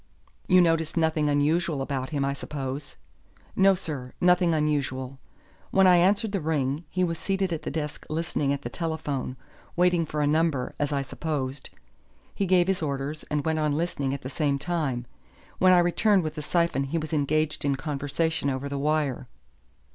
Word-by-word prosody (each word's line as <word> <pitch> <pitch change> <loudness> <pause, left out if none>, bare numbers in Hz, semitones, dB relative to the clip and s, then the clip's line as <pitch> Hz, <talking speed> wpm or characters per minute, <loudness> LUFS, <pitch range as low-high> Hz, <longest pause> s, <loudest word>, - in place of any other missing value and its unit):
"You 185 -1 +6
noticed 165 -1 +1
nothing 160 -2 +2
unusual 150 +2 +1
about 135 -1 -3
him, 145 -3 -1
I 140 - 0
suppose." 140 0 -6 0.6
"No, 195 0 +5
sir, 145 -8 -5
nothing 180 -1 +4
unusual. 135 -4 -1 0.5
When 190 0 +4
I 180 -1 +7
answered 200 +4 +3
the 195 -3 -1
ring, 150 0 -1
he 185 - 0
was 165 -2 -1
seated 195 -2 -1
at 160 - -3
the - - -4
desk 150 0 -4
listening 155 -3 -1
at 140 - -2
the 120 - -4
telephone, 150 -6 -3 0.4
waiting 175 -2 +3
for 150 0 -2
a - - +3
number, 150 -3 +1
as 145 0 0
I 140 -1 0
supposed. 140 -2 -4 0.6
He 200 - -1
gave 180 -1 +4
his 190 -2 0
orders 140 0 -3
and 150 -1 -1
went 160 -1 +1
on 150 -1 +1
listening 150 -5 -1
at 140 - -4
the 130 - -5
same 145 -2 0
time. 145 -6 -2 0.5
When 185 0 +6
I 180 - +7
returned 180 +3 +3
with 155 -1 -3
the 155 - -5
syphon 170 -3 +1
he 150 +5 -2
was 155 0 -4
engaged 155 +1 0
in 140 -1 +1
conversation 145 +2 -1
over 135 +1 -3
the 140 0 -3
wire." 145 -4 0
155 Hz, 180 wpm, -26 LUFS, 140-170 Hz, 0.6 s, I